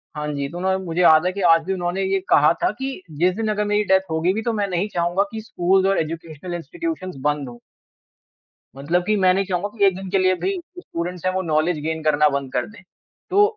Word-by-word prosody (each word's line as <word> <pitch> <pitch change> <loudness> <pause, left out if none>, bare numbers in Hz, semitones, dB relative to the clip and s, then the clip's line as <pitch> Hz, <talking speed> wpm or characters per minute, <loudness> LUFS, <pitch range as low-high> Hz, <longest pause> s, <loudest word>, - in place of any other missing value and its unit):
हाँ 150 0 -3
जी 140 -1 -2
तो 175 - -8
उन्होंने, 190 +1 0
तो 190 - -7
मुझे 170 +1 -1
आज 160 -2 +7
भी 200 - -3
याद 165 -1 +4 0.3
है 195 - 0
ये 195 - +2
कहा 150 +2 +6
था - - +4
कि 265 -6 -4
जिस 175 +5 +1
दिन 225 +1 -2
अगर 210 0 -1
मेरी 210 0 +1
डेथ 190 -1 +4
होगी 165 +3 +1
भी 220 - -2
तो 235 - -1
मैं 205 -2 0
नहीं 185 +2 -1
चाहूँगा 175 +3 +1
कि 220 -1 -5
स्कूल्स 190 -2 +1
और 195 - +2
एजुकेशनल 165 +1 -5
इंस्टिट्यूशन्स 320 - -5
बंद 145 -3 -3
हों। 120 - -11 1.2
मतलब 165 +6 0
कि 215 - +3
मैं 185 -2 +4
नहीं 195 +1 0
चाहूँगा 185 +1 -1
कि 200 - +4
एक 190 -2 +3
दिन 190 0 -7
के 195 - +1
लिए 185 0 +3
भी 390 - -2
जो 360 +1 -11
स्टूडेंट्स 175 - -5
हैं 185 - +2
वो 190 - 0
नॉलेज 160 0 +1
गेन 160 0 -2
करना 150 -1 +4
बंद 140 -2 -3
कर - - 0
दें। 225 - -14 0.5
तो 400 +2 +5
185 Hz, 240 wpm, -22 LUFS, 160-200 Hz, 1.2 s, आज